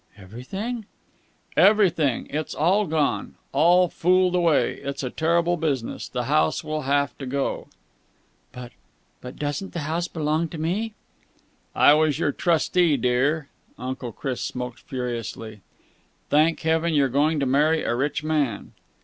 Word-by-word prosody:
"Everything?" 190 - -6 0.7
"Everything! 185 - +3
It's 155 +1 -3
all 190 +7 +2
gone! 150 -2 -1 0.2
All 175 +5 +4
fooled 180 +2 +2
away. 170 -4 +2
It's 140 0 -5
a 125 - -3
terrible 170 +2 +1
business. 140 -7 -2
This 125 -1 -3
house 150 +4 +1
will 155 0 -3
have 140 0 +1
to 135 - -6
go." 140 +1 -2 0.8
"But 125 -1 -9 0.5
but 125 +1 -9
doesn't 145 +6 -4
the 170 - -3
house 165 +4 -2
belong 160 0 -1
to 165 - -7
me?" 200 +8 -2 0.8
"I 145 - +6
was 155 -2 +2
your 145 - +1
trustee, 170 -1 +2
dear." 135 +5 0 0.3
Uncle 130 -1 -5
Chris 130 +3 -4
smoked 125 0 -5
furiously. 115 -5 -6 0.7
"Thank 155 +3 +3
heaven 160 0 +1
you're 140 -2 +4
going 145 +4 +1
to 140 - 0
marry 150 +4 +2
a - - 0
rich 145 +4 -1
man!" 150 -8 -1
150 Hz, 140 wpm, -24 LUFS, 130-170 Hz, 0.8 s, I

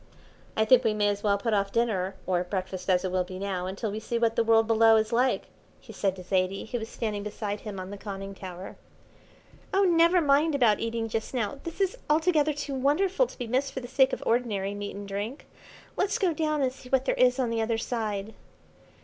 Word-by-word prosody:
"I 220 - +3
think 255 +2 +6
we 220 -2 +1
may 205 -1 +2
as 205 0 -2
well 205 -1 +2
put 220 +2 -1
off 200 -1 +1
dinner, 200 -5 0
or 180 -1 +1
breakfast 185 0 -4
as 180 0 +3
it 185 - -2
will 185 0 +1
be 185 +1 -8
now, 190 -2 -3
until 200 +3 -3
we 215 - -4
see 235 +2 -3
what 230 -1 +1
the 230 - +3
world 225 0 +4
below 225 0 +5
is 220 +1 +1
like," 250 +2 +2 0.4
he - - -13
said 195 -2 0
to 185 - -9
Zaidie, 185 +1 0
who 240 +2 -3
was 220 0 -6
standing 210 -3 -3
beside 205 0 -4
him 205 -3 -7
on 185 +1 -7
the 205 - -8
conning 195 -1 -6
tower. 185 -1 -9 0.9
"Oh, 390 +1 +3
never 340 0 +5
mind 295 0 +3
about 235 -6 +3
eating 230 0 -2
just 225 +3 -4
now, 230 +2 -2
this 335 +2 -7
is 390 +5 0
altogether 310 -1 +3
too 285 -1 -5
wonderful 360 - +2
to - - -14
be 245 - -4
missed 260 +4 -1
for - - -3
the 245 - -8
sake 265 +1 +3
of - - -4
ordinary 215 -5 0
meat 205 0 -5
and 200 0 -7
drink. 205 +7 -5 0.5
Let's 400 +1 0
go 370 -4 +1
down 305 -2 0
and 255 -1 0
see 255 -1 -14
what 265 0 +2
there - - +2
is 250 0 +3
on 250 -3 0
the 230 -1 0
other 225 0 0
side." 220 -3 -3
225 Hz, 230 wpm, -27 LUFS, 200-265 Hz, 0.9 s, think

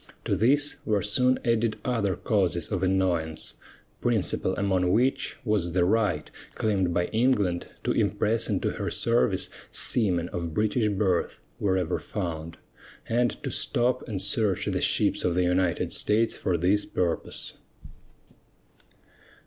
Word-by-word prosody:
To - - +1
this 145 +6 +3
were 105 -4 0
soon 125 +5 +2
added 115 -1 +1
other 110 -7 0
causes 95 -5 +1
of 90 -3 -1
annoyance, 90 -4 0 0.5
principal 105 -5 0
among 95 -3 +1
which 125 +7 +1
was 100 -6 0
the 90 -1 +3
right 100 -6 0 0.2
claimed 95 -5 0
by 90 +1 +1
England 105 -7 +1 0.2
to - - 0
impress 105 +2 +1
into 100 -3 0
her - - -4
service 65 - +2 0.2
seamen 90 -7 +1
of 85 -2 -5
British 110 +1 +1
birth, 95 -3 0 0.2
wherever 95 -3 0
found, 85 -5 -5 0.5
and 120 +1 +2
to - - -3
stop 125 +1 0
and 100 -4 -3
search 100 0 +1
the - - -1
ships - - +2
of 85 - 0
the 90 - +2
United 90 -1 0
States 110 +2 +2
for 90 -2 -1
this 95 +5 +2
purpose. 85 -2 -3
100 Hz, 135 wpm, -26 LUFS, 90-110 Hz, 0.5 s, this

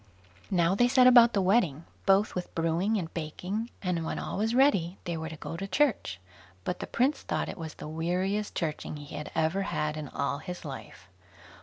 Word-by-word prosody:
Now 175 -1 +3
they 245 +5 +4
set 255 0 +5
about 240 -2 +8
the 195 - +2
wedding, 180 - +2 0.2
both 195 +2 +4
with 180 -1 -5
brewing 170 +6 +1
and 165 -5 -4
baking; 180 +8 -4
and 180 -3 0
when 160 - -3
all - - -4
was 225 +3 +1
ready, 200 - +3
they 175 -2 -3
were 160 0 -4
to 160 - -7
go 150 +1 -6
to 195 +4 -4
church; 195 - +1 0.4
but 180 - -3
the - - -5
prince 275 +4 +1
thought - - -2
it - - -7 0.2
the - - -7
weariest 180 +6 -1
churching 155 -2 -3
he 145 0 -9
had 150 0 -5
ever 160 +5 +1
had 155 -5 -1
in 150 -1 -5
all 140 0 -2
his 180 +1 -7
life. 135 -6 -9
180 Hz, 195 wpm, -29 LUFS, 160-210 Hz, 0.4 s, about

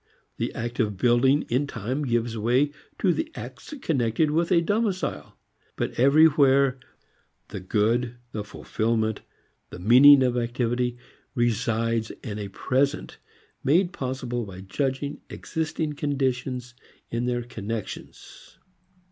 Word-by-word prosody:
The - - -2
act 120 +1 -4
of 105 -4 0
building 125 +6 +3
in 130 +5 0
time 130 +4 -3
gives 120 -2 0
way 125 +6 +2 0.3
to 185 -3 +2
the 320 - -3
acts - - -9
connected 135 +1 +1
with 165 +2 +1
a 170 - +6
domicile. 205 +2 -2 0.4
But - - -2
everywhere 140 -1 +5 0.7
the - - -6
good, 115 +5 0 0.2
the 105 - -4
fulfilment, 110 +1 -1 0.5
the - - -9
meaning 130 +8 +7
of 125 -1 +1
activity, 120 0 -1 0.4
resides 115 -1 0
in 105 -1 -5
a 100 - -4
present 135 +8 -1 0.4
made 175 +6 +3
possible 125 -5 -3
by 95 -3 -9
judging 135 +8 -3
existing 160 -1 -3
conditions 130 -4 -2 0.4
in 120 +1 -1
their 120 -1 -1
connections. 115 -2 -8
125 Hz, 120 wpm, -25 LUFS, 115-145 Hz, 0.7 s, meaning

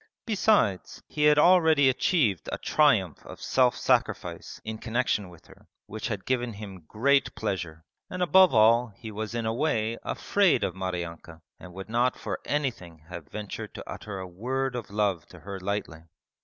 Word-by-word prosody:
Besides, 205 - +1
he 150 -1 0
had 150 0 +5
already 160 -4 +5
achieved 125 - +1
a - - -2
triumph 115 - +2
of - - -11
self 125 -2 +2
sacrifice - - -1
in 110 0 -5
connexion 115 -4 -1
with 85 -2 -17
her - - -19 0.2
which 110 +2 -5
had 105 -5 -4
given 125 -2 -1
him 100 -5 -10
great 140 +5 +2
pleasure, 85 -6 -4 0.3
and 185 0 -2
above 185 +2 +6
all 115 +1 +5
he 110 +1 -9
was 110 +2 -5
in 115 -1 -2
a 110 - 0
way 115 -4 -1
afraid 200 -4 +1
of 90 - -1
Maryanka 85 -3 -6 0.2
and 90 -1 -12
would 95 0 -7
not 120 +3 +1
for - - -4
anything 90 - -3
have 85 -4 -8
ventured 105 +4 -7
to - - -9
utter 100 -2 -7
a 95 - -5
word 125 +8 -3
of 120 -2 -5
love 100 -5 -1
to - - -15
her 100 0 -7
lightly. 95 -4 -4
110 Hz, 170 wpm, -27 LUFS, 95-135 Hz, 0.3 s, above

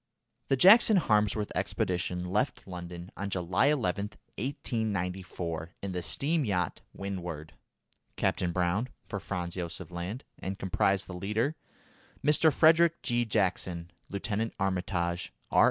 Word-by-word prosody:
The 135 - +2
Jackson 210 - +8
Harmsworth 105 - +2
expedition 90 0 -1
left 95 +4 -1
London 90 -1 -7
on 100 0 -3
July 90 +5 +1
11, 105 -9 +1 0.3
1894, 95 - -3
in 100 - -2
the 90 -1 -2
steam 150 - 0
yacht 90 - -1
Windward, 90 -6 -5 0.6
Captain 90 -1 0
Browne, 90 +7 0 0.2
for 100 - -4
Franz 90 -3 -4
Josef 90 0 -5
Land, 90 +9 -5 0.2
and 95 +1 -4
comprised 95 +1 +1
the 95 - -8
leader, 105 - -1 0.7
Mr. 155 +2 +6
Frederick 165 +3 +5
G. 120 -1 +1
Jackson; 90 -5 -1 0.2
Lieutenant 105 +3 -2
Armitage, 90 -2 -1 0.2
R. - - +4
95 Hz, 120 wpm, -30 LUFS, 90-115 Hz, 0.7 s, Jackson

